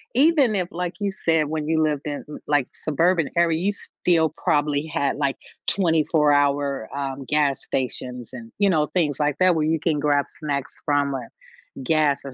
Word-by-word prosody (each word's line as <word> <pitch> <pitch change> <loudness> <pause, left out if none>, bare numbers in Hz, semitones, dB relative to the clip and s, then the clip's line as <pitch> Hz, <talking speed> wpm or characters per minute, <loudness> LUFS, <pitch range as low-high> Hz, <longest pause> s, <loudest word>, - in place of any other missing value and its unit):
even 280 -4 +4
if, 180 -3 0
like 175 +1 -4
you 200 -1 -1
said, 160 -5 +1
when 155 -1 -3
you 160 0 +2
lived 150 -2 +1
in, 145 -1 -4 0.2
like, 145 -3 +2
suburban 165 +1 +1
area, 170 -2 +3
you 195 +4 +1
still 165 -5 0
probably 145 0 +1
had 140 -1 0
like 140 -2 0 0.3
twenty-four-hour, 145 - +2
um, 135 -1 -4
gas 145 -1 +1
stations 125 -2 -4
and, 115 -3 -9
you 200 -1 +4
know, 155 -5 +2
things 150 -6 +1
like 150 -1 +1
that 185 -1 +4
where 155 -1 +1
you 160 +1 +1
can 155 -1 0
grab 145 -1 +2
snacks 140 -3 -5
from, 145 -2 +1
uh, - - -2
or 120 - -9 0.6
gas, 150 0 +2
or 135 - -7
150 Hz, 180 wpm, -23 LUFS, 140-165 Hz, 0.6 s, even